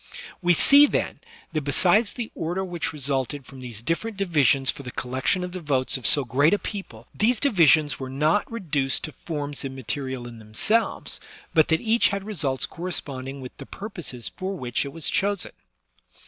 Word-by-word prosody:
We 175 Hz, -1 st, +4 dB
see, 285 Hz, -, +8 dB
then, -, -, -2 dB, 0.3 s
that 155 Hz, -, 0 dB
besides 185 Hz, -, +3 dB
the 240 Hz, -3 st, -5 dB
order 175 Hz, +4 st, -3 dB
which 175 Hz, -4 st, -3 dB
resulted 140 Hz, -1 st, -2 dB
from 135 Hz, 0 st, -13 dB
these 120 Hz, -4 st, -8 dB
different 200 Hz, -, -2 dB
divisions 145 Hz, -8 st, +3 dB
for -, -, -10 dB
the 130 Hz, -, -7 dB
collection 130 Hz, +9 st, -1 dB
of 180 Hz, -, -5 dB
the 185 Hz, -, -5 dB
votes 140 Hz, -5 st, +1 dB
of 130 Hz, -5 st, +1 dB
so 145 Hz, -3 st, +6 dB
great 140 Hz, -, +3 dB
a -, -, -1 dB
people, 190 Hz, -, -7 dB
these 225 Hz, +2 st, +2 dB
divisions 160 Hz, -, +4 dB
were 130 Hz, -1 st, -5 dB
not 155 Hz, +11 st, +1 dB
reduced 150 Hz, -12 st, 0 dB
to 155 Hz, -, -4 dB
forms 145 Hz, -3 st, -5 dB
immaterial 130 Hz, -1 st, -4 dB
in 115 Hz, -1 st, -10 dB
themselves, 110 Hz, -, -1 dB, 0.3 s
but 155 Hz, -2 st, +5 dB
that 160 Hz, 0 st, +1 dB
each 230 Hz, +1 st, +3 dB
had 200 Hz, -1 st, -3 dB
results 145 Hz, -, -1 dB
corresponding 140 Hz, -6 st, -4 dB
with 130 Hz, -, -9 dB
the -, -, -10 dB
purposes 175 Hz, -, -5 dB
for 190 Hz, +1 st, -5 dB
which 125 Hz, -2 st, -2 dB
it 140 Hz, -, -6 dB
was 165 Hz, +2 st, -2 dB
chosen. 200 Hz, -2 st, 0 dB
150 Hz, 175 wpm, -24 LUFS, 130-190 Hz, 0.3 s, see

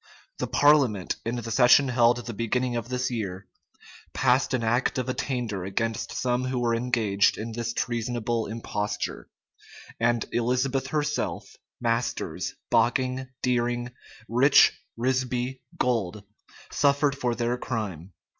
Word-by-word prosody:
The -, -, -1 dB
parliament, 135 Hz, -10 st, +3 dB
in 120 Hz, -, -1 dB
the 115 Hz, -1 st, -5 dB
session 125 Hz, +3 st, +6 dB
held 120 Hz, -1 st, +3 dB
the 115 Hz, -, -5 dB
beginning 120 Hz, +3 st, -1 dB
of 120 Hz, 0 st, -4 dB
this 125 Hz, 0 st, -1 dB
year, 100 Hz, -5 st, -4 dB, 0.7 s
passed 130 Hz, 0 st, +2 dB
an 120 Hz, -, -2 dB
act 120 Hz, +4 st, +1 dB
of 130 Hz, -1 st, -2 dB
attainder 120 Hz, -7 st, -2 dB
against 110 Hz, +4 st, -2 dB
some 125 Hz, 0 st, 0 dB
who 130 Hz, 0 st, -2 dB
were 120 Hz, -1 st, +1 dB
engaged 115 Hz, -4 st, +2 dB
in 115 Hz, +2 st, -5 dB
this 115 Hz, +1 st, -3 dB
treasonable 120 Hz, -1 st, -2 dB
imposture,[*] 105 Hz, -2 st, -4 dB, 0.7 s
and 115 Hz, 0 st, +1 dB
Elizabeth 130 Hz, +3 st, 0 dB
herself, 145 Hz, 0 st, -2 dB, 0.2 s
Masters, 115 Hz, 0 st, -2 dB, 0.2 s
Bocking, 130 Hz, +1 st, +1 dB, 0.2 s
Deering, 120 Hz, -1 st, 0 dB, 0.4 s
Rich, 130 Hz, +5 st, +6 dB, 0.2 s
Risby, 125 Hz, +1 st, -1 dB, 0.2 s
Gold, 105 Hz, -5 st, -1 dB, 0.5 s
suffered 140 Hz, 0 st, +2 dB
for 125 Hz, -4 st, -1 dB
their 120 Hz, +1 st, 0 dB
crime. 100 Hz, -8 st, -4 dB
120 Hz, 125 wpm, -26 LUFS, 115-130 Hz, 0.7 s, session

